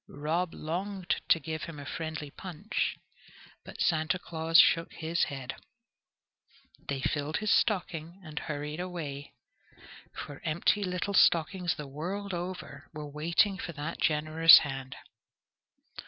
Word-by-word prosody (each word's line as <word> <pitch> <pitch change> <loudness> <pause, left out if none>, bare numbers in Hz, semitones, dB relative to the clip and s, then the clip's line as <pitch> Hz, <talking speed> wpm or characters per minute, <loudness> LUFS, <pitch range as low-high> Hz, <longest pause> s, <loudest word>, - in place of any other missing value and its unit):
Rob 160 +5 -2
longed 185 +3 -3
to 165 - +6
give 160 +1 -5
him 165 -3 -8
a 145 - -8
friendly 160 -1 -5
punch, 185 +5 -3 0.7
but - - -11
Santa 160 +1 +2
Claus 165 -1 +1
shook 165 0 +5
his 165 +1 0
head. 135 -2 -5 1.3
They 140 -1 -4
filled 145 +2 -1
his 215 -1 0
stocking 175 -4 0
and 155 -3 -5
hurried 150 +1 -5
away, 155 -7 -6 0.8
for 145 - -8
empty 170 +5 +1
little 180 +2 -2
stockings 175 0 +3
the 150 - -7
world 180 +8 -5
over 175 -5 -6
were 150 -1 -5
waiting 170 +6 +2
for 170 - -5
that 150 +2 -5
generous 155 +1 +7
hand. 135 -1 -6
160 Hz, 125 wpm, -30 LUFS, 150-180 Hz, 1.3 s, generous